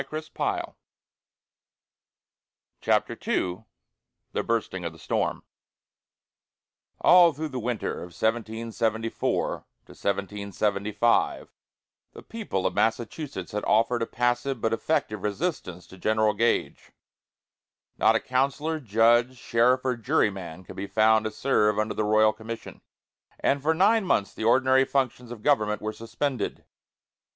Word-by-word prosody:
GULIAN 155 +3 -6
VERPLANCK. 155 - -3 2.1
CHAPTER - - +1
II 90 +4 -1 0.7
THE - - -1
BURSTING 110 -5 -2
OF 85 -1 -4
THE - - -15
STORM - - -2 1.6
All 175 -2 +7
through 155 +1 -4
the 130 -2 -4
winter 120 -1 -3
of - - -7
1774 110 0 -1 0.3
75, 100 +2 -1 0.6
the - - -12
people 210 - -4
of - - +1
Massachusetts 115 - -2
had 105 - -3
offered 115 +2 +2
a 115 - -1
passive 120 +2 -1
but 110 +1 0
effective 110 -5 -1
resistance 105 - -3
to 95 - -15
General 110 +1 +2
Gage. 120 0 -1 1.0
Not - - +4
a - - +3
councillor, 140 +5 -1
judge, 120 +1 +3
sheriff, 125 +2 +2
or 130 -1 +1
juryman 95 -6 -1
could - - -12
be 100 +1 -4
found 110 +2 +3
to 110 - -2
serve 105 -6 +1
under 110 0 0
the 110 - -1
royal 110 +1 +4
commission; 110 +2 -8 0.6
and 140 0 +1
for 160 +3 +1
nine 205 +4 +3
months 100 - +1
the 110 - -5
ordinary 130 +3 +4
functions 125 -3 -1
of 115 -3 -9
government 105 -7 +2
were 110 0 -4
suspended. 115 +3 -3
115 Hz, 125 wpm, -26 LUFS, 105-130 Hz, 2.1 s, All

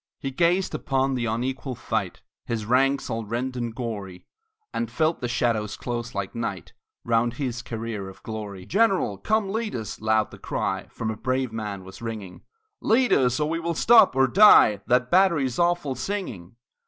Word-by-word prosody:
He 135 - -4
gazed 175 +6 +1
upon 135 -2 0
the 120 -2 -1
unequal 130 +3 -3
fight, - - -3 0.2
His 115 -3 -2
ranks 135 +4 +2
all 115 -2 -3
rent 120 +4 -3
and 120 -2 -4
gory, 100 -7 -6 0.5
And 235 - -2
felt 160 -1 0
the 120 - -1
shadows 110 -3 -1
close 120 -2 -5
like 100 -1 -3
night 115 -5 -5 0.3
Round 115 0 +2
his 125 -3 -3
career 115 -4 -5
of 95 - -15
glory. 105 -4 -6
"General, 185 - +1
come 215 - 0
lead 220 0 -2
us!" 110 -3 -6
loud 110 0 +1
the - - -12
cry - - -3
From 110 -1 -4
a - - -5
brave 130 0 -2
band 105 -4 -5
was 95 +3 -12
ringing 110 -5 -6 0.4
"Lead 230 -1 +3
us, 125 0 +2
and 150 +1 0
we 165 - -1
will 170 0 -2
stop, 230 - +6
or 135 0 +4
die, 130 - +7
That 125 0 +2
battery's 170 -9 +3
awful 175 -5 +1
singing!" 125 - -5
125 Hz, 175 wpm, -25 LUFS, 110-155 Hz, 0.5 s, die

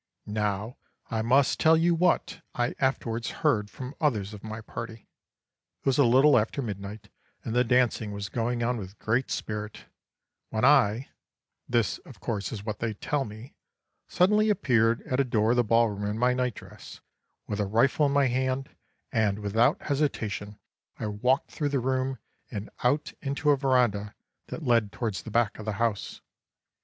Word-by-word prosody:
"Now 105 +2 -2 0.3
I 110 -1 0
must 130 +4 +3
tell 160 +1 +5
you 170 +2 +3
what 175 +1 +1
I 120 0 0
afterwards 120 -3 -1 0.2
heard 105 -9 +2
from 130 +4 -7
others 110 -9 0
of 105 - -10
my 110 0 -6
party. 110 0 -8 0.7
It - - -36
was 135 0 +2
a 140 - +6
little 130 +3 +6
after 125 +6 -2
midnight, 100 -1 -6 0.4
and 110 - -3
the 125 +1 +4
dancing 125 -3 +2
was 100 0 -4
going 120 +1 -1
on 120 +1 0
with 95 -1 -8
great 120 +4 0
spirit, 105 0 -5 0.6
when 110 +2 0
I 125 -4 +4 0.6
this, 120 -5 +1
of - - -15
course, 100 -4 -3
is 105 -3 -6
what 105 -2 -4
they 115 -2 -2
tell 140 +6 -1
me 110 +4 -10 0.5
suddenly 210 +4 +3
appeared 115 - +2
at 130 - -2
a - - +5
door 110 -3 +1
of 125 - +2
the 120 - +4
ball 115 +1 +3
room 105 0 -3
in 105 - -3
my 125 +2 +3
night 125 -3 -1
dress, - - -12 0.5
with 105 - -4
a 105 - 0
rifle 130 +8 +3
in - - -1
my 140 0 +3
hand, 130 +1 -1 0.4
and, 105 -5 +1
without 110 +6 +1
hesitation, 110 -8 -2 0.4
I - - -4
walked 125 +7 0
through 145 -2 -1
the 140 -1 0
room 130 +1 -1 0.3
and 105 -1 -6
out 140 +5 +1
into 145 +1 +1
a - - +5
verandah 125 -7 +1 0.3
that 160 - -6
led 115 -4 +3
towards 110 -6 -3
the - - -9
back 115 0 +1
of 110 - -7
the 110 - -1
house. 110 0 -2
115 Hz, 175 wpm, -27 LUFS, 105-130 Hz, 0.7 s, a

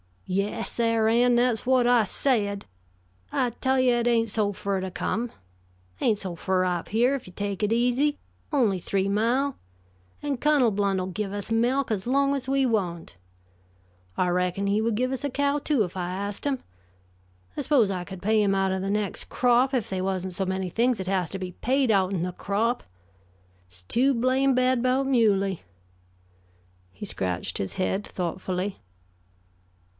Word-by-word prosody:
"Yes, 200 +4 -2
Sar' 230 -2 +2
Ann, 240 +2 +4
that's 240 -2 +2
whut 255 -1 +3
I 240 -3 +4
said. 205 -3 0 0.7
I 250 - +1
tell 260 +3 0
you, 250 -1 +4
it 240 0 0
ain't 230 -1 +2
so 205 -1 0
fur 200 0 -2
to 190 0 -3
come, 230 +6 -2 0.7
ain't 220 -3 +2
so 185 -4 -4
fur 185 +2 0
up 180 -1 -2
here, 240 +5 +3
if 275 -7 -4
you 180 - -12
take 200 0 -3
it 210 +2 +2
easy; 250 +5 +2 0.3
only 230 -10 +2
three 195 +2 -1
mile. 245 +7 +1 0.7
And 285 -4 -2
Cunnel 290 -6 +3
Blount'll 195 -2 0
give 200 +1 -3
us 205 +2 -5
melk 245 +3 +1
as 205 0 -2
long 275 +2 +2
as 270 -2 -3
we 270 0 +2
want. 180 - -2 1.0
I 180 - +2
reckon 180 +2 0
he 205 +2 +2
would 225 -1 0
give 255 +3 0
us 265 +2 -3
a - - 0
cow, 285 +2 0
too, 285 -5 +1
if 180 0 -6
I 175 -1 -2
ast 200 +5 -4
him. 270 -2 -1 0.9
I - - 0
s'pose 240 -9 +3
I 180 -2 -3
could 190 -1 -9
pay 215 +1 +3
him 195 -1 +2
out 195 0 +1
o' 190 - -1
the 195 +1 -3
next 205 -1 -2
crop, 250 +2 +3
if 245 -6 0
they 190 -1 -2
wasn't 185 -1 -2
so 190 +2 -2
many 190 0 -2
things 240 +5 +1
that 190 -2 -5
has 185 -3 0
to 195 - -4
be 185 -1 -5
paid 255 +5 +1
out'n 190 -3 +1
the 180 - -2
crop. 220 +7 -1 0.8
It's 90 0 -11
too 255 - +2
blame 260 +2 +2
bad 255 -1 +2
'bout 255 +2 +2
Muley." 200 -7 +2 1.3
He 95 - -8
scratched 90 -2 -2
his 95 - -3
head 190 +2 -1
thoughtfully. 185 +2 -3
215 Hz, 180 wpm, -26 LUFS, 190-250 Hz, 1.3 s, Ann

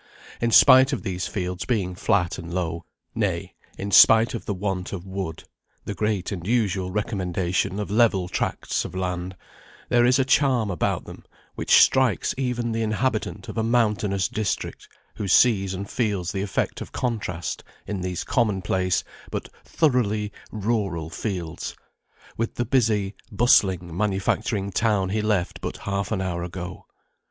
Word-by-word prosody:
In 115 - +2
spite 130 +3 +7
of - - -3
these 90 -1 -3
fields 90 -3 -3
being 100 -7 0
flat 90 -2 0
and 85 0 -8
low, 85 -2 -3 0.3
nay, - - -2 0.2
in 100 +1 -4
spite 115 +5 +7
of 115 - -6
the 105 - 0
want 95 -1 -3
of 95 -2 -5
wood 95 -4 -5 0.4
(the 100 - -3
great 105 -2 -1
and 90 -3 -5
usual 100 -6 +1
recommendation 95 -2 -1
of 105 -1 -4
level 105 -5 +3
tracts - - -2
of - - -8
land), 90 0 -3 0.5
there 120 0 +4
is 125 +1 +4
a 135 - +2
charm 130 -6 +2
about 90 - -1
them - - -11 0.3
which - - +4
strikes 130 -9 +2
even 125 -3 -1
the 115 0 -1
inhabitant 110 -2 -1
of - - -4
a - - +1
mountainous 105 -5 +1
district, 110 -3 -3 0.3
who 105 -3 -3
sees 95 -1 +4
and 100 +2 -5
feels 100 -8 -1
the 95 - -2
effect 100 -2 -2
of - - -7
contrast 105 -9 -3 0.2
in 100 -3 -4
these 90 -1 -3
common 105 -7 0
place 95 -1 +1 0.3
but - - -5
thoroughly 110 -9 +1 0.2
rural 100 -7 -2
fields, 90 -6 -4 0.6
with 115 - -2
the 120 - -1
busy, 110 -5 +1 0.2
bustling 95 -6 +3
manufacturing 100 +1 0
town 100 -2 +1
he 105 +2 0
left 105 -5 -1
but - - -4
half 100 0 -3
an 105 -4 0
hour 90 -2 -2
ago. 90 +1 -7
100 Hz, 155 wpm, -24 LUFS, 90-115 Hz, 0.6 s, spite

